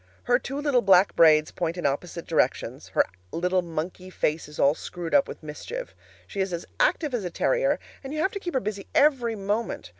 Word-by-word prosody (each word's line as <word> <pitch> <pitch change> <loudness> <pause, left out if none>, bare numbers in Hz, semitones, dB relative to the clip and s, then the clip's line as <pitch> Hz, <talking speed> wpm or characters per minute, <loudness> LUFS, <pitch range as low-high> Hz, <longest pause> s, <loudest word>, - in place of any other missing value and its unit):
Her 245 +1 +3
two 270 +2 -5
little 285 -4 +2
black 195 -1 +5
braids 155 -2 +5
point 170 0 -2
in 175 - -4
opposite 165 +5 -2
directions; - - 0
her - - +5 0.3
little 180 +2 +1
monkey 175 +2 -5
face 160 -4 -1
is 150 - -12
all 140 - +4
screwed 170 +1 -6
up 280 -1 +5
with - - -9
mischief; 475 - -6 0.3
she 200 - -7
is 190 -1 -1
as 170 -1 -4
active 335 - +2
as 235 -4 -1
a 180 - -2
terrier, - - +1 0.3
and 270 - -6
you 305 - -4
have 380 - +1
to 400 - -5
keep 350 -5 -5
her - - +4
busy 200 -3 -5
every 260 -6 +3
moment. 205 - -2
195 Hz, 210 wpm, -26 LUFS, 170-270 Hz, 0.3 s, black